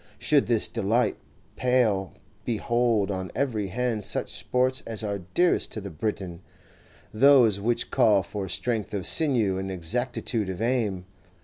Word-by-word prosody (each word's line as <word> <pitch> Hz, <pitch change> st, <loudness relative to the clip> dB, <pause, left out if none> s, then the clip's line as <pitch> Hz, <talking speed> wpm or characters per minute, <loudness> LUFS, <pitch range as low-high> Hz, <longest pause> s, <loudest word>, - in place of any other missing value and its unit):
Should 145 Hz, -2 st, +2 dB
this 115 Hz, -3 st, +3 dB
delight 115 Hz, 0 st, 0 dB, 0.4 s
pall, 115 Hz, -7 st, +1 dB, 0.3 s
behold 115 Hz, -3 st, 0 dB
on 95 Hz, -2 st, -5 dB
every 115 Hz, -8 st, -1 dB
hand 115 Hz, +2 st, -2 dB
such -, -, -3 dB
sports 130 Hz, +1 st, 0 dB
as 110 Hz, -1 st, -3 dB
are 100 Hz, -1 st, -3 dB, 0.2 s
dearest 175 Hz, 0 st, +2 dB
to -, -, -3 dB
the 100 Hz, -2 st, -8 dB
Briton, 90 Hz, 0 st, -4 dB, 0.7 s
those 120 Hz, -4 st, +5 dB
which 120 Hz, +3 st, -1 dB
call 105 Hz, -4 st, +3 dB
for 95 Hz, +1 st, -6 dB
strength 110 Hz, +3 st, -2 dB
of 95 Hz, -3 st, -3 dB
sinew 115 Hz, -, +4 dB
and 95 Hz, 0 st, -4 dB
exactitude 105 Hz, +3 st, -2 dB
of 95 Hz, -1 st, -5 dB
aim. 110 Hz, -6 st, -1 dB
110 Hz, 140 wpm, -25 LUFS, 95-125 Hz, 0.7 s, those